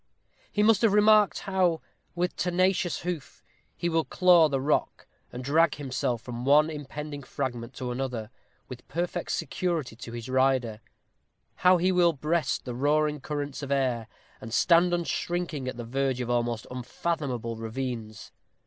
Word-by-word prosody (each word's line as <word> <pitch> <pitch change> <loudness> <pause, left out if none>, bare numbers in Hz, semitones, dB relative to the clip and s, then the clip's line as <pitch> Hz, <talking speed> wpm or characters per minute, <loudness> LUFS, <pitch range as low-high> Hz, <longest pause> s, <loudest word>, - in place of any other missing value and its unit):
He 210 - +1
must 220 0 +4
have 225 -4 +4
remarked 210 -2 +5
how, 185 -4 +1 0.4
with 180 +1 -1
tenacious 180 -1 +1
hoof, 175 -5 -5 0.3
he 175 - -2
will 165 -1 +1
claw 175 -3 +5
the 135 -1 0
rock, 145 +3 0 0.3
and 125 - -6
drag 155 +3 +3
himself 130 -4 -2
from 120 -1 -6
one 150 +4 +5
impending 150 0 -6
fragment 125 -3 -5
to 125 -1 -4
another, 120 -3 -4 0.4
with 125 -1 -10
perfect 175 +3 -3
security 165 -10 -2
to 115 0 -9
his 120 0 -6
rider; 130 -4 +1 0.8
how 180 0 +5
he 180 +2 +2
will 175 -2 +4
breast 155 +3 -1
the 125 - -4
roaring 150 +3 +1
currents 145 0 -4
of 140 -1 -5
air, 125 -5 0 0.3
and 115 +1 -4
stand 175 +1 +4
unshrinking 175 -4 -2
at 130 - -4
the 120 - -6
verge 135 +1 -1
of 120 -1 -2
almost 120 -2 -1
unfathomable 125 -2 -3
ravines. 115 -2 -5
140 Hz, 150 wpm, -27 LUFS, 125-170 Hz, 0.8 s, remarked